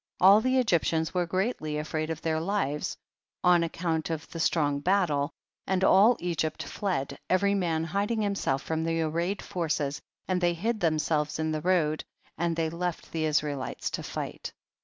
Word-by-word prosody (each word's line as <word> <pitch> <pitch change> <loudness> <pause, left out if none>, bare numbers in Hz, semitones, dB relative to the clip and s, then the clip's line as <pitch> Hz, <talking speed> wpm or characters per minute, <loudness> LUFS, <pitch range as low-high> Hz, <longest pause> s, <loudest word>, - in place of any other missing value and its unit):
All 195 +4 +7
the 255 +2 +2
Egyptians 165 -8 +1
were 180 -2 0
greatly 185 -5 -1
afraid 155 +1 -2
of 160 -1 -4
their 160 -1 +1
lives 160 -5 -1 0.5
on 175 -1 +5
account 165 -1 -2
of 160 -1 -4
the 165 - -6
strong 145 -3 +2
battle, 160 -5 +2 0.4
and 190 0 +1
all 210 +6 +6
Egypt 165 -3 -2
fled, 180 -10 -3
every 200 +2 +3
man 170 -5 0
hiding 200 +6 -1
himself 195 -9 0
from 160 0 -2
the 165 0 0
arrayed 170 +5 -1
forces, 150 -6 -2 0.3
and 185 -1 0
they 175 -1 +2
hid 220 +6 -1
them 160 -4 +2
selves 150 0 0
in 160 0 -1
the 155 -1 -2
road, 160 -3 +1 0.3
and 170 -1 0
they 165 -1 0
left 175 0 -4
the 160 -1 -1
Israelites 150 -3 -1
to - - -3
fight. - - -5
165 Hz, 170 wpm, -28 LUFS, 155-185 Hz, 0.5 s, All